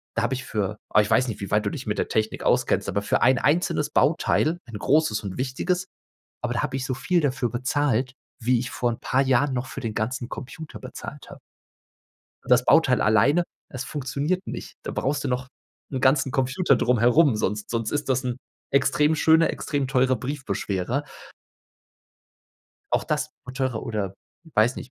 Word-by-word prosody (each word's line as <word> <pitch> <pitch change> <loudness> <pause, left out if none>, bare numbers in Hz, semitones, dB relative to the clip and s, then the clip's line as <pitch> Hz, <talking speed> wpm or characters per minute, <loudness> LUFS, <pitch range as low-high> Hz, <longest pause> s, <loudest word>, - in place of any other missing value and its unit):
da 115 - +1
habe 115 +3 0
ich 130 0 -4
für 105 -1 -2
aber 105 - +5
ich 105 - -3
weiß 130 - +4
nicht, 110 -4 -5
wie 100 - -5
weit 105 0 +2
du - - +1
dich 125 +3 -7
mit 105 - -1
der - - 0
Technik 110 0 -1
auskennst, - - +2
aber 100 - 0
für 100 - 0
ein 130 +1 +5
einzelnes 150 +3 +1
Bauteil, 160 +2 +2
ein 115 -3 -7
großes 140 -3 +2
und 95 -2 -5
wichtiges, 175 +8 -1 0.6
aber 120 0 -1
da 120 - 0
habe 135 -2 -3
ich 130 - -3
so 130 - -2
viel 135 +7 +1
dafür 130 -4 0
bezahlt, 130 0 0 0.3
wie 125 +1 +2
ich 125 - -4
vor 120 -2 -1
paar 135 - +2
Jahren 135 +1 +2
noch 125 +1 -2
für 135 - -7
den 115 -4 -4
ganzen 120 +3 -2
Computer 155 +5 -8
bezahlt - - -9
habe. - - -11 1.1
Das 125 0 +4
Bauteil 135 -5 +4
alleine, 140 +11 +4 0.2
es 130 -1 -5
funktioniert 145 +7 -2
nicht. - - -7
Da - - -5
brauchst 140 0 -1
du - - 0
noch 125 +1 -2 0.4
'n 130 - -2
ganzen 135 0 +3
Computer 135 +2 +2
drumherum, 125 +3 +4
sonst 105 0 -2
sonst 115 -1 -1
ist 145 -1 -2
das 130 0 +1
'n 125 -1 -2 0.3
extrem 150 +3 +3
schöner, 160 +1 +4
extrem 140 -2 -2
teurer 130 -1 +2
Briefbeschwerer. 125 -3 -2 1.9
Auch - - +2
das 150 -1 -1
wird 125 +1 -9
teurer. 130 -4 -1
Oder, 100 -4 -3 0.4
weiß 110 +4 +3
nicht, - - -8
130 Hz, 185 wpm, -25 LUFS, 120-145 Hz, 1.9 s, aber